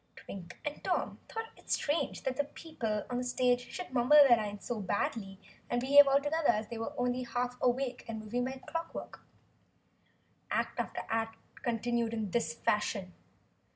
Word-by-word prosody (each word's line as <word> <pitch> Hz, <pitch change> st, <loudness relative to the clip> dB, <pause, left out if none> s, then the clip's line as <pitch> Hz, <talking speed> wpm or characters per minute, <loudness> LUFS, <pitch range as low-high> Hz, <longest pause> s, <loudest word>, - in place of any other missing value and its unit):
Twink 175 Hz, -3 st, -9 dB
and 295 Hz, 0 st, -4 dB
Tom -, -, -1 dB
thought 450 Hz, 0 st, -5 dB
it -, -, -19 dB
strange 295 Hz, +3 st, 0 dB
that 260 Hz, -1 st, -1 dB
the 285 Hz, -, 0 dB
people 235 Hz, -9 st, -4 dB
on 245 Hz, -, 0 dB
the -, -, -1 dB
stage 250 Hz, 0 st, +1 dB
should 360 Hz, -7 st, -6 dB
mumble 250 Hz, +3 st, +5 dB
their 240 Hz, -, +8 dB
lines 205 Hz, -2 st, -4 dB
so 240 Hz, -3 st, -2 dB
badly 195 Hz, +1 st, -2 dB, 0.3 s
and 240 Hz, -, +1 dB
behave 280 Hz, +3 st, +8 dB
altogether 290 Hz, +3 st, +2 dB
as 215 Hz, -2 st, +3 dB
though -, -, -23 dB
they 230 Hz, -, -4 dB
were 225 Hz, -, -4 dB
only 245 Hz, 0 st, +1 dB
half 245 Hz, 0 st, -2 dB
awake 250 Hz, 0 st, +1 dB
and 225 Hz, -1 st, -4 dB
were 215 Hz, -, -7 dB
moving 245 Hz, +3 st, -1 dB
by 265 Hz, 0 st, -4 dB
clockwork. 330 Hz, +2 st, -5 dB, 1.3 s
Act -, -, -1 dB
after -, -, -2 dB
act 225 Hz, 0 st, -1 dB, 0.2 s
continued 235 Hz, -1 st, 0 dB
in 215 Hz, -4 st, -2 dB
this 230 Hz, -8 st, +1 dB
fashion. 200 Hz, -1 st, 0 dB
245 Hz, 175 wpm, -32 LUFS, 220-265 Hz, 1.3 s, their